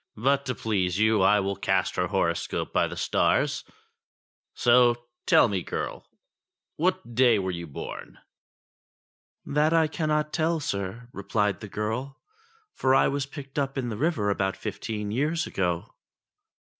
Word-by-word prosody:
But 140 Hz, +4 st, +1 dB
to 125 Hz, -, -1 dB
please 95 Hz, -4 st, 0 dB
you, 110 Hz, -1 st, +3 dB
I 105 Hz, +2 st, +5 dB
will 100 Hz, +1 st, -2 dB
cast 95 Hz, -1 st, 0 dB
her 90 Hz, 0 st, 0 dB
horoscope -, -, -1 dB
by -, -, +3 dB
the -, -, -7 dB
stars; -, -, +1 dB, 0.9 s
so 120 Hz, 0 st, +4 dB, 0.2 s
tell -, -, +6 dB
me, 100 Hz, -4 st, -1 dB
girl, -, -, -5 dB, 0.7 s
what 185 Hz, -5 st, -1 dB
day 120 Hz, -1 st, +5 dB
you 100 Hz, -, 0 dB
were 85 Hz, -2 st, -4 dB
born 70 Hz, -, -8 dB, 0.6 s
?" -, -, -63 dB
*'That 150 Hz, +3 st, +2 dB
I 165 Hz, -1 st, +5 dB
cannot 150 Hz, -1 st, -1 dB
tell, 165 Hz, 0 st, +1 dB
sir," 100 Hz, -1 st, -4 dB
replied 105 Hz, +1 st, -1 dB
the 105 Hz, -, -8 dB
girl, 110 Hz, +7 st, -3 dB, 0.5 s
"for 130 Hz, 0 st, +2 dB
I -, -, +4 dB
was 140 Hz, -1 st, -2 dB
picked 140 Hz, 0 st, -6 dB
up 135 Hz, 0 st, -2 dB
in 125 Hz, -2 st, -2 dB
the 110 Hz, -, -3 dB
river 125 Hz, -6 st, 0 dB
about 95 Hz, -1 st, -1 dB
fifteen 105 Hz, 0 st, -4 dB
years 155 Hz, +8 st, 0 dB
ago." 90 Hz, -2 st, -2 dB
120 Hz, 150 wpm, -26 LUFS, 100-140 Hz, 0.9 s, tell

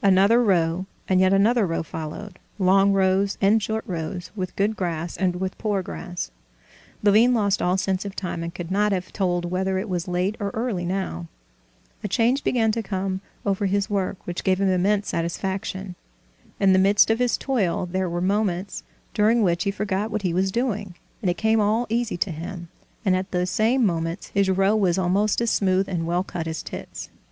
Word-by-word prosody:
Another 200 Hz, +4 st, +5 dB
row, 180 Hz, -2 st, +1 dB, 0.2 s
and 185 Hz, -1 st, +3 dB
yet 190 Hz, 0 st, +4 dB
another 210 Hz, +2 st, +3 dB
row, 165 Hz, 0 st, -1 dB
followed—long 195 Hz, +4 st, 0 dB
rows 195 Hz, 0 st, +2 dB
and 210 Hz, +3 st, +4 dB
short 220 Hz, +1 st, -2 dB
rows, 175 Hz, -2 st, -5 dB
with 185 Hz, -3 st, -4 dB
good 205 Hz, +2 st, +1 dB
grass 170 Hz, -3 st, -3 dB
and 185 Hz, -2 st, 0 dB
with 185 Hz, +1 st, -3 dB
poor 205 Hz, -3 st, 0 dB
grass. 175 Hz, -, -6 dB, 0.7 s
Levin 220 Hz, +5 st, +5 dB
lost 205 Hz, -3 st, +1 dB
all 180 Hz, +1 st, +2 dB
sense 190 Hz, 0 st, -1 dB
of 200 Hz, -1 st, -7 dB
time, 180 Hz, -3 st, -4 dB
and 170 Hz, 0 st, -5 dB
could 175 Hz, 0 st, -6 dB
not 210 Hz, +2 st, +2 dB
have 185 Hz, -1 st, -4 dB
told 175 Hz, -3 st, 0 dB
whether 190 Hz, +1 st, 0 dB
it 190 Hz, +4 st, -3 dB
was 180 Hz, -1 st, -2 dB
late 180 Hz, +3 st, 0 dB
or 200 Hz, -1 st, -1 dB
early 220 Hz, -6 st, -2 dB
now. 175 Hz, -, -3 dB, 0.8 s
A -, -, -1 dB
change 245 Hz, +4 st, +1 dB
began 225 Hz, -3 st, +2 dB
to 230 Hz, +1 st, -1 dB
come 190 Hz, -2 st, -3 dB, 0.2 s
over 200 Hz, 0 st, +1 dB
his 200 Hz, +2 st, 0 dB
work, 195 Hz, -1 st, -1 dB
which 175 Hz, 0 st, -4 dB
gave 185 Hz, 0 st, +2 dB
him 195 Hz, -1 st, +2 dB
immense 195 Hz, +3 st, +1 dB
satisfaction. 190 Hz, +2 st, -3 dB, 0.7 s
In 195 Hz, -1 st, +5 dB
the 185 Hz, -, +5 dB
midst 200 Hz, +3 st, +5 dB
of 225 Hz, -, +1 dB
his 250 Hz, -1 st, +2 dB
toil 210 Hz, -10 st, 0 dB
there 185 Hz, +1 st, -2 dB
were 175 Hz, +1 st, -2 dB
moments 195 Hz, -1 st, -1 dB, 0.3 s
during 220 Hz, +2 st, +3 dB
which 170 Hz, -2 st, +1 dB
he -, -, +2 dB
forgot 200 Hz, +1 st, -2 dB
what 215 Hz, -2 st, -3 dB
he 180 Hz, -3 st, 0 dB
was 190 Hz, +2 st, +1 dB
doing, 210 Hz, -5 st, -2 dB, 0.3 s
and 190 Hz, -, +1 dB
it 175 Hz, -, -1 dB
came 220 Hz, 0 st, +2 dB
all 215 Hz, +4 st, +2 dB
easy 230 Hz, -3 st, -1 dB
to 180 Hz, -, -1 dB
him, 170 Hz, +2 st, -7 dB, 0.4 s
and 185 Hz, -2 st, +4 dB
at 185 Hz, +1 st, -2 dB
those 180 Hz, 0 st, -1 dB
same 235 Hz, +3 st, +2 dB
moments 165 Hz, -1 st, -2 dB
his 200 Hz, -1 st, +1 dB
row 195 Hz, +2 st, +3 dB
was 190 Hz, -4 st, +2 dB
almost 195 Hz, +4 st, +1 dB
as 235 Hz, -, +1 dB
smooth 190 Hz, 0 st, +2 dB
and 170 Hz, -3 st, -2 dB
well 175 Hz, +2 st, +1 dB
cut 165 Hz, -3 st, -5 dB
as 160 Hz, -1 st, -4 dB
Tit's. -, -, -8 dB
190 Hz, 195 wpm, -24 LUFS, 180-210 Hz, 0.8 s, Another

